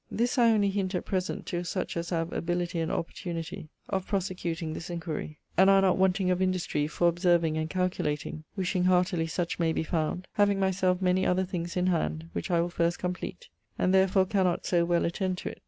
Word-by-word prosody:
This 245 +3 0
I 235 -1 +6
only 205 -3 +3
hint 195 -1 -1
at 180 - -2
present 185 -1 -2
to 175 -2 -3
such 185 +2 -3
as 170 0 -3
have 165 -1 -2
ability 175 0 -1
and 165 - -1
opportunity 165 0 -4 0.2
of 190 -1 -2
prosecuting 175 -5 -2
this 165 - -6
inquiry, 165 -3 -5 0.2
and 190 +3 +6
are 195 0 +6
not 185 -2 +4
wanting 190 0 +2
of 180 +1 0
industry 185 -5 0
for 175 +3 +1
observing 170 -2 +2
and 155 0 -2
calculating, 155 -4 -2
wishing 185 -2 0
heartily 180 -2 +2
such 170 +2 -2
may 165 -1 +2
be 160 - -1
found, 165 +2 -2
having 205 -1 +3
my 190 -1 +2
self 185 0 +1
many 185 +1 +3
other 185 +1 +2
things 175 -2 -4
in 180 - +2
hand, 80 - -1
which 85 - -4
I 170 -1 +3
will 175 - -1
first 170 0 0
compleat, 180 - -5 0.3
and 185 - +2
therefore 190 0 +4
cannot 185 -3 +1
soe 170 -2 +2
well 175 0 +2
attend 185 +2 -1
(to) - - -4
it. - - -10
180 Hz, 205 wpm, -28 LUFS, 170-190 Hz, 0.3 s, I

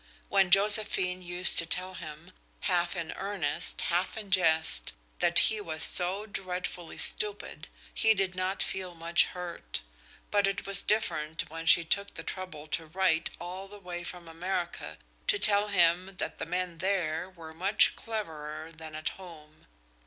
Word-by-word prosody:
When 195 -2 +3
Josephine 195 -2 +4
used 175 +1 +4
to 170 - 0
tell 185 +2 -1
him, 160 0 -10 0.3
half 175 -1 0
in 170 -2 -4
earnest, 190 -7 -3
half 175 +5 -1
in 205 -3 -8
jest, 160 -4 +3 0.3
that - - +2
he 215 -1 +5
was 160 -5 -3
"so 190 +4 +3
dreadfully 180 -4 -5
stupid," 425 -2 +2 0.3
he 220 0 +3
did 190 -2 0
not 185 +1 -1
feel 185 -2 -4
much 165 +1 +3
hurt; 175 - -6 0.5
but 205 -1 +3
it 195 - -3
was 200 0 +3
different 165 -6 -1
when 165 0 -7
she 165 0 +6
took 200 +4 0
the - - -7
trouble 185 -5 -6
to 160 +1 -2
write 170 -1 +1
all 180 +3 -7
the 205 +1 -12
way 180 -3 -7
from 175 -1 -8
America 175 +2 -4 0.3
to 400 - +4
tell 210 - +5
him 180 0 +2
that - - -4
the - - -4
men 180 -1 -3
there 185 -3 -1
were 165 -4 -12
much 190 +6 +3
cleverer 160 -8 -6
than 160 -1 -10
at 155 - -2
home. 155 - -14
180 Hz, 160 wpm, -29 LUFS, 165-195 Hz, 0.5 s, she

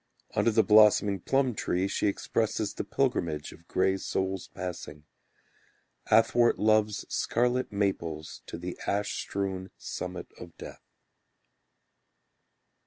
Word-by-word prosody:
Under - - +3
the 110 0 +4
blossoming 105 -2 +5
plum 135 +5 +1
tree, 95 -2 -1
She 100 - 0
expresses 105 +1 -1
the - - -4
pilgrimage 85 - -1
Of 85 - -16
grey 95 +1 +1
souls 95 0 -2
passing, 85 -5 -7 1.0
Athwart 120 +2 +4
love's 110 -1 +2
scarlet 125 +2 0
maples 85 -6 -2
To - - -6
the 90 +1 -6
ash 100 +1 -1
strewn 95 -1 -3
summit 90 0 -6
of 85 -2 -11
death. - - -10
100 Hz, 110 wpm, -29 LUFS, 90-110 Hz, 1.0 s, blossoming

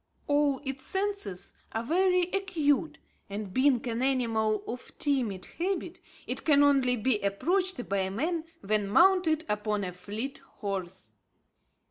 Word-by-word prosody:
All 290 -2 +2
its 270 -1 -4
senses 385 - -2 0.2
are 225 - -1
very 360 +6 +3
acute; 320 -5 +1 0.3
and 200 -1 -5
being 260 -2 +3
an 230 0 -2
animal 225 -5 +1
of 245 +1 -7
timid 240 -10 -1
habit, 375 +2 -2 0.3
it - - -4
can 290 -2 +5
only 270 -3 +4
be 225 -1 +1
approached 345 - 0
by 190 -1 0
man 315 - -1 0.2
when 205 0 0
mounted 335 - +4
upon 210 -1 -1
a 180 - -3
fleet 215 +9 -6
horse. 190 - -6
260 Hz, 130 wpm, -29 LUFS, 210-315 Hz, 0.3 s, can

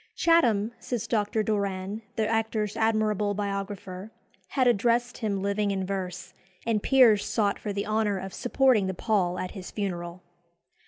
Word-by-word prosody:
"Chatham," 235 -11 +3
says 235 -4 -3
Dr. 215 -1 0
Doran, 200 -1 -2
the 220 -1 +1
actor's 220 -2 -1
admirable 215 -2 +1
biographer, 200 -1 -4 0.4
"had 260 -3 +1
addressed 240 +2 +2
him 200 -4 -1
living 200 +1 0
in 190 -1 -1
verse, 185 -1 -5 0.3
and 225 -2 +1
peers 240 -6 +5
sought 205 -3 0
for 210 - -4
the 200 0 -2
honour 215 -2 +1
of 190 0 -6
supporting 245 -5 +2
the 190 - -3
pall 185 -4 0
at 185 - -4
his 190 -3 -8
funeral." 180 -3 -4
205 Hz, 150 wpm, -27 LUFS, 195-220 Hz, 0.4 s, peers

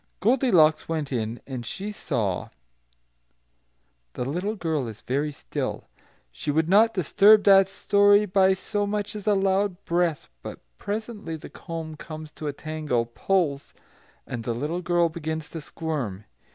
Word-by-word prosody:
Goldilocks 190 - +3
went 155 -4 -2
in, 115 -1 -3
and 130 -3 -5
she 195 - -5
saw" 105 - -2 1.6
the 125 - -3
little 180 - -2
girl 160 - -1
is 110 -2 -9
very 145 +4 -1
still; 140 - -5 0.4
she 105 - -6
would 155 +2 +2
not 215 +5 +5
disturb 205 +4 +5
that 195 -1 +6
story 205 +1 +4
by 190 -1 +3
so 205 +2 -2
much 210 +1 -3
as 210 0 -7
a 210 - +4
loud 195 0 0
breath; 170 -3 0
but - - -8 0.2
presently 210 -5 -4
the 155 - -10
comb 165 -2 -6
comes 155 -1 -8
to 155 - -7
a - - 0
tangle, 150 -5 -2
pulls, 140 - -1 0.5
and 120 -2 -5
the 115 0 -2
little 150 +8 -2
girl 175 -1 +2
begins 160 -1 -5
to 165 - -7
squirm. 140 - -4
165 Hz, 150 wpm, -25 LUFS, 145-200 Hz, 1.6 s, that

